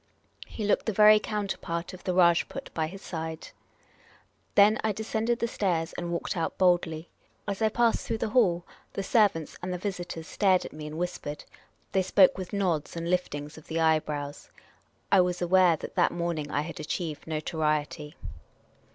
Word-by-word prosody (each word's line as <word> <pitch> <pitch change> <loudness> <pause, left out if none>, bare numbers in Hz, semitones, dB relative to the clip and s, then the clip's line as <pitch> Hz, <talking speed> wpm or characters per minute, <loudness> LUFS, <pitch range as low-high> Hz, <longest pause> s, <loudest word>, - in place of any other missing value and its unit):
He 215 - -5
looked 210 - +1
the - - +2
very 215 +1 +7
counterpart 190 -5 -3
of 185 - -11
the 185 - 0
Rajput 175 +9 +2
by 160 -1 -1
his 195 +4 -10
side. 160 -1 -5 1.1
Then 210 +2 +6
I 220 - +2
descended 220 +2 -1
the 235 - -1
stairs 175 -7 -1
and 175 -1 -4
walked 170 - -2
out 165 - -2
boldly. 175 -3 +2 0.4
As 200 +1 -3
I 220 - +4
passed 235 +1 +1
through 225 - -1
the 220 - -2
hall, 185 -8 +3 0.3
the 195 - -3
servants 195 -7 +2
and 180 - -4
the 180 - -2
visitors 180 -4 -5
stared 190 0 +2
at - - -8
me 150 0 -7
and 155 +1 -7
whispered. 170 -4 -4 0.5
They 190 - +2
spoke 190 0 +5
with 185 -2 -6
nods 180 -8 -1
and 170 +1 -3
liftings 150 -4 -2
of 155 - -20
the 165 0 -2
eyebrows. 150 -3 0 0.6
I 195 - +7
was 180 0 0
aware 180 -1 +4
that - - -8
that - - +3
morning 170 -4 -2
I 145 - 0
had 160 +1 -7
achieved 155 0 -4
notoriety. 155 -1 -2
175 Hz, 175 wpm, -28 LUFS, 160-200 Hz, 1.1 s, very